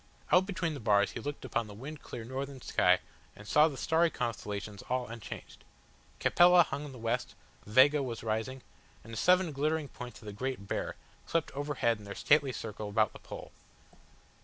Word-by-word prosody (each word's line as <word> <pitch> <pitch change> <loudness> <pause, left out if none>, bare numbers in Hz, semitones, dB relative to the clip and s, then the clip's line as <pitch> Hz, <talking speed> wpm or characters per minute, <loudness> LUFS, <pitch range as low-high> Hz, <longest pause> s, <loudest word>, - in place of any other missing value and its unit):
Out 185 +1 +5
between 185 -5 -1
the 145 - -6
bars 105 -3 +3
he - - -5
looked 145 0 -5
upon 115 -2 -1
the 105 - -10
wind 140 +7 -8
clear 120 - -7
northern 135 +3 -5
sky - - +3 0.4
and 105 - -12
saw 150 +6 +6
the 145 -4 -5
starry 165 +4 +3
constellations 105 -6 -4
all 125 0 0
unchanged. 115 -2 -9 0.6
Capella 175 0 +6
hung 145 -1 -5
in 145 - -8
the 130 - -10
west, 115 +2 -2 0.3
Vega 135 +7 +6
was 120 -4 -4
rising, 110 +4 -2 0.4
and 115 - -11
the - - -4
seven 180 +2 +4
glittering 150 +1 0
points 125 0 -9
of - - -15
the 105 - -6
Great 125 -2 -4
Bear - - -2 0.3
swept 165 -2 0
overhead 140 -6 0
in 105 - -12
their 100 - -6
stately 145 -2 +4
circle 110 -3 -5
about 110 0 +2
the - - -11
Pole. - - -9
130 Hz, 185 wpm, -31 LUFS, 110-150 Hz, 0.6 s, saw